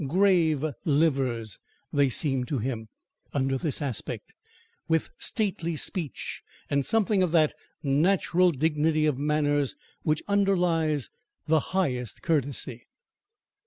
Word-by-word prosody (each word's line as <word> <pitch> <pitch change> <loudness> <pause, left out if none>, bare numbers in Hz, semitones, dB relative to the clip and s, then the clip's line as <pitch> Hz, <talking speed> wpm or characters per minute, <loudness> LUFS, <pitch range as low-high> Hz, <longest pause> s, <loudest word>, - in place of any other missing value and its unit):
"Grave 165 -3 +3 0.2
livers," 135 - +1 0.3
they 140 -2 +3
seemed 130 -1 +1
to 140 - -1
him, 115 -2 -3 0.5
under 135 -1 +1
this 150 +2 -1
aspect, 130 -7 -4 0.5
with 160 -1 +1
stately 180 -7 -1
speech, 155 - -2 0.3
and 140 -1 +2
something 210 +2 +2
of 180 -3 +1
that 155 -3 +4 0.3
natural 175 +5 +3
dignity 155 +1 +1
of 145 -4 +1
manners, 145 -1 +1 0.3
which 155 -1 0
underlies 175 -8 +1 0.3
the 160 0 +3 0.2
highest 125 - -1
courtesy. 140 -6 -1
150 Hz, 110 wpm, -27 LUFS, 135-170 Hz, 0.5 s, that